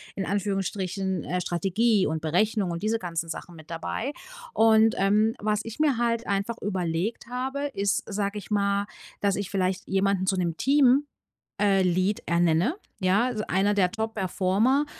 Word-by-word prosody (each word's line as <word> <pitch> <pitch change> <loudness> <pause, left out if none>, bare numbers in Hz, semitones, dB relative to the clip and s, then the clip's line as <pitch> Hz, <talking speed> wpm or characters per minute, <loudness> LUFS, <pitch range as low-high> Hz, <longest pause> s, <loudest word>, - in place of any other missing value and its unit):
in 195 - -2
Anführungsstrichen- 195 -1 -2
ähm, 180 - -2
„Strategie 195 +5 +1
und 160 +1 -2
Berechnung“ 190 +5 +1
und 170 +3 -5
diese 225 +1 +1
ganzen 165 -3 -4
Sachen 175 +1 -7
mit 160 0 -13
dabei. 220 +10 -3 0.4
Und, 220 0 +5
ähm, 210 +3 +3
was 210 0 0
ich 225 +4 -8
mir 295 -5 +3
halt 235 0 0
einfach 200 +4 -1
überlegt 185 +2 -2
habe, 260 +3 -3
ist, 200 -1 0
sage 200 0 -2
ich 205 +1 -9
mal, 200 -1 +1 0.4
dass 200 -1 +2
ich 200 -2 -3
vielleicht 190 -1 -1
jemanden 195 0 +1
zu 190 - +2
'nem 170 -3 -1
Team 275 0 +4 0.6
äh, 195 -2 +4
Lead 185 +3 +1
ernenne, 170 - +2 0.3
ja? 195 +5 +3
Also 225 -4 -2
einer 200 +2 +2
der 185 -3 +3
Top-Performer 220 +4 +1
200 Hz, 160 wpm, -26 LUFS, 185-220 Hz, 0.6 s, Und